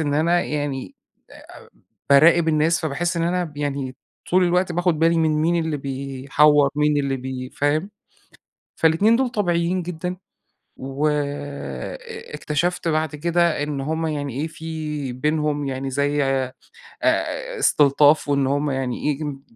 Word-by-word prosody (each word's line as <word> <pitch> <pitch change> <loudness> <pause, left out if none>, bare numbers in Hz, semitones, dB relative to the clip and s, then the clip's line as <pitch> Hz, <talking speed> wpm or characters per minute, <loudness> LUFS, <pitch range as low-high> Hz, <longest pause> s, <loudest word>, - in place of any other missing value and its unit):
إن 145 -2 0
أنا 170 +4 +3
يعني 145 - -4 0.4
أ - - -17 0.3
أ - - -22 0.4
باراقب 160 +4 +6
الناس، 160 +2 +2
فباحس 165 +3 -2
إن 165 - 0
أنا 175 -1 -1
يعني 140 -3 -3 0.3
طول 185 +1 +4
الوقت 180 +1 +1
باخد 175 -2 +1
بالي، 165 +1 +3
من 160 -1 +2
مين 160 +3 +1
اللي 160 -2 -1
بيحوّر، 140 +1 +2
مين 150 0 +2
اللي 140 -1 -1
بي 130 0 -6
فاهم؟ 155 +7 0 0.9
فال2 165 +8 +4
دول 260 +1 +1
طبيعيين 180 -4 0
جدًا، 180 +1 -4 0.6
وأ 135 +3 -1 0.9
أ 470 -1 -9
اكتشفت 170 +3 -1
بعد 155 -1 0
كده، 170 0 +1
إن 145 -2 -3
هم 160 +3 -2
يعني 145 -4 -3
إيه، 160 - -1
في 155 -4 -5
بينهم 150 +2 -1
يعني 135 0 -3
زي 145 +2 +1
آآ 135 -1 -1 1.1
استلطاف، 145 - +4
وإن 140 -2 +2
هم 145 +1 0
يعني 130 -2 -3
ييجم 145 -1 -3
150 Hz, 140 wpm, -22 LUFS, 140-170 Hz, 1.1 s, باراقب